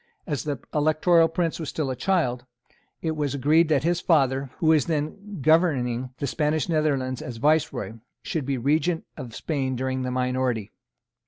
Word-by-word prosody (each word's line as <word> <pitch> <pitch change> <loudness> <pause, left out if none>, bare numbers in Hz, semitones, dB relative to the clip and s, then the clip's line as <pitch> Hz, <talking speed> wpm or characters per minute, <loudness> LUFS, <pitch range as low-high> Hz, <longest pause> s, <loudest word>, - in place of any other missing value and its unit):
As 150 -6 -3
the 145 -2 -2 0.2
Electoral 155 +3 +4
Prince 165 0 -1
was 160 - -4
still 145 -4 -2
a - - -3
child, 125 -5 0 0.6
it 160 - 0
was 145 -2 -1
agreed 155 +4 +3
that 145 -3 +2
his 175 +1 +1
father, 135 -4 +2
who - - -3
was 155 -3 +4
then 170 +6 -3
governing 130 -7 +2
the 140 - -3
Spanish 150 +1 0
Netherlands 140 -6 0
as 125 -3 -6
Viceroy, 145 -3 +1 0.3
should 150 -5 -3
be 135 -1 0
Regent 155 +6 +1
of 125 -6 -8
Spain 135 -5 -2
during 130 +1 -2
the 130 - -2
minority. 125 -4 -1
145 Hz, 165 wpm, -25 LUFS, 130-160 Hz, 0.6 s, Electoral